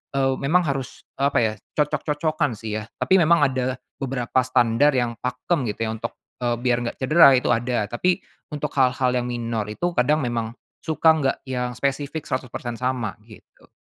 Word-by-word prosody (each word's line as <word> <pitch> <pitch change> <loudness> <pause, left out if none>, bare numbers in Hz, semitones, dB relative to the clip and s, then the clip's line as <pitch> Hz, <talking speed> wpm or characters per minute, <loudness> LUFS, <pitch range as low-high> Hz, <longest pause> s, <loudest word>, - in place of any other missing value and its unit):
eee, 135 -1 +2
memang 165 +6 +3
harus 135 -3 -4 0.2
apa 140 +1 +1
ya 110 -2 +1 0.2
cocok-cocokan 150 -1 0
sih 110 0 -4
ya. 110 - -7
Tapi 190 - +3
memang 170 -1 +4
ada 130 -1 -1 0.2
beberapa 130 -2 -1
standar 130 +3 +3
yang 120 -2 0
pakem 135 - -1
gitu - - -11
ya - - -1
untuk, 115 +2 -5 0.3
eee, 120 -1 0
biar 125 -1 +2
nggak - - -4
cedera 140 +1 +7
itu 125 - 0
ada. 120 -2 0
Tapi 180 +9 0 0.3
untuk 150 -1 -3
hal-hal 130 -1 +3
yang 125 0 -2
minor 115 -3 -2
itu 175 +12 -2
kadang 150 +5 +3
memang 115 -2 -2 0.3
suka 160 0 +2
nggak 135 -3 0
yang 125 -1 -2
spesifik 140 +3 -2
100% 125 -2 -4
sama 125 -5 -2
gitu. 110 - -18
130 Hz, 170 wpm, -23 LUFS, 120-145 Hz, 0.3 s, cedera